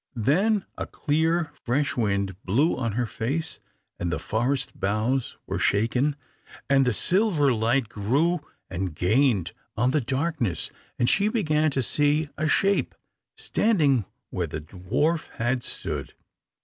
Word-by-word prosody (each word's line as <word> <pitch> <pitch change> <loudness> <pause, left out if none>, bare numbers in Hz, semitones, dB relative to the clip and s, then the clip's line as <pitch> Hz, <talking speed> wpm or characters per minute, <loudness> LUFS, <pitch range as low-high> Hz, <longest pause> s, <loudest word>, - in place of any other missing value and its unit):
Then 190 - +2
a - - -3
clear 160 +1 0
fresh 135 +4 0
wind 100 -4 0
blew 135 - +2
on 115 -4 -2
her 120 +2 0
face, 140 +9 -3 0.4
and 85 -1 -1
the - - 0
forest 125 +5 -1
boughs 110 +6 0
were - - -3
shaken, 125 +7 +2 0.5
and 135 0 +4
the - - +4
silver 170 - +2
light 115 +2 +1
grew 135 - +1 0.3
and 90 -3 -4
gained 100 - +2 0.3
on 125 +3 +3
the 150 - +2
darkness, 130 - -1 0.3
and 120 - +2
she 200 +9 +4
began 155 -9 +2
to 135 -2 -1
see 145 +4 +2
a 155 +1 -1
shape 195 +5 +2 0.4
standing 150 - +2 0.3
where - - -1
the 75 - -5
dwarf 115 - -1
had 120 +2 0
stood. - - -5
135 Hz, 135 wpm, -26 LUFS, 110-155 Hz, 0.5 s, and